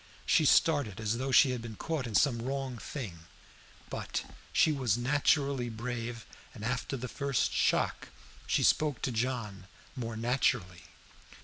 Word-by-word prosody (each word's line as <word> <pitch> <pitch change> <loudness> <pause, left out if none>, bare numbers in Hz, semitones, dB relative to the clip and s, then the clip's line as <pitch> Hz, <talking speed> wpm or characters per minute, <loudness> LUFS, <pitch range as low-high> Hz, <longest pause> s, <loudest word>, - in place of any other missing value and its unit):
She 155 - +4
started 140 - +3
as 110 +2 -1
though 135 +1 -2
she 130 0 +6
had 125 -2 -3
been 115 -2 -7
caught 150 +1 -3
in 110 - -5
some 125 -5 +3
wrong 130 -1 -3
thing; 90 - -7 0.6
but - - -3 0.3
she 160 - +4
was 130 -7 +1
naturally 140 0 +1
brave, 115 0 -5 0.3
and 110 - -7
after 125 +3 -2
the 125 +1 -5
first 140 -1 -1
shock - - +1 0.4
she - - +2
spoke 150 -5 +2
to 130 - 0
John 110 -5 -3 0.3
more 115 -3 -4
naturally. 115 -7 0
125 Hz, 145 wpm, -31 LUFS, 115-135 Hz, 0.6 s, she